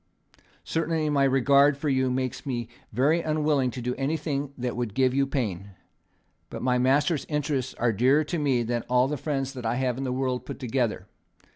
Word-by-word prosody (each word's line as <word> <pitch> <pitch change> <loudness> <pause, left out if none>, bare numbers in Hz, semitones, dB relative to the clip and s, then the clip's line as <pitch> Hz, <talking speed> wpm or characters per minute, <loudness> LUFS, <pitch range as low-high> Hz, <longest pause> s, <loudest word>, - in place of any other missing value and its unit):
Certainly 160 -2 -1
my 140 -1 +3
regard 140 +2 +4
for 150 - -3
you 130 -2 +2
makes 130 -1 -2
me 120 -5 -3 0.2
very 145 +9 +2
unwilling 150 -4 +1
to 125 0 -6
do 125 +1 -1
anything 145 -1 -2
that 125 -1 -3
would 120 -4 -3
give 130 -1 +3
you 135 0 +2
pain. 100 -8 -3 0.7
But - - -7
my 125 -1 +2
master's 145 +5 +2
interests 145 -4 -2
are 115 -1 +1
dearer 130 +8 +3
to 165 +2 -3
me 135 -5 +1
than 120 +1 -1
all 125 +1 +4
the 150 - -2
friends 135 -2 -2
that 125 -3 -7
I 115 +1 0
have 130 -1 -1
in - - -2
the 130 - -2
world 130 -1 -1
put 140 - -7
together. 125 -3 -1
130 Hz, 190 wpm, -26 LUFS, 125-145 Hz, 0.7 s, regard